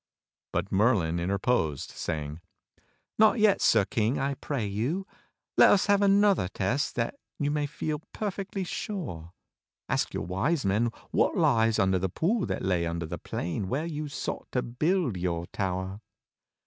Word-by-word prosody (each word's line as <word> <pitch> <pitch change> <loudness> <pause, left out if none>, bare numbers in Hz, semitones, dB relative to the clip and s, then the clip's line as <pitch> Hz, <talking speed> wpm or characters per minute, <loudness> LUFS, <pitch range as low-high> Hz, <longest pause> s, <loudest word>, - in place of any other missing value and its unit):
But 90 +3 -2
Merlin 95 -5 +2
interposed, 90 - 0
saying: 75 +1 -4 0.8
"Not 220 +2 +6
yet. 215 -2 +4
Sir 105 -3 +4
King, 115 +1 0
I 140 +1 -1
])ray 135 -7 0
you. 120 - -2 0.5
Let - - +8
us 200 - +4
have 205 0 +3
another 200 - +4
test 105 - -1
that - - -1 0.2
you 145 -1 0
may 150 -1 0
feel 150 +1 -3
perfectly 195 -2 -3
sure. 150 - -5 0.6
Ask - - 0
your - - -2
Wise 100 - 0
Men 105 +5 +2 0.2
what - - +2
lies 115 -1 +3
under 95 -2 +3
the 95 +1 -1
pool 190 - 0
that - - -3
lay 90 -3 +1
under 85 0 -3
the 80 - -6
plain 90 +3 -3
where 145 +5 -1
you 155 -2 -4
sought 140 - -5
to 125 - +1
build 150 - 0
y 90 - +1
)ur 85 0 -3
tower." 95 +1 -2
115 Hz, 160 wpm, -28 LUFS, -, 0.8 s, Let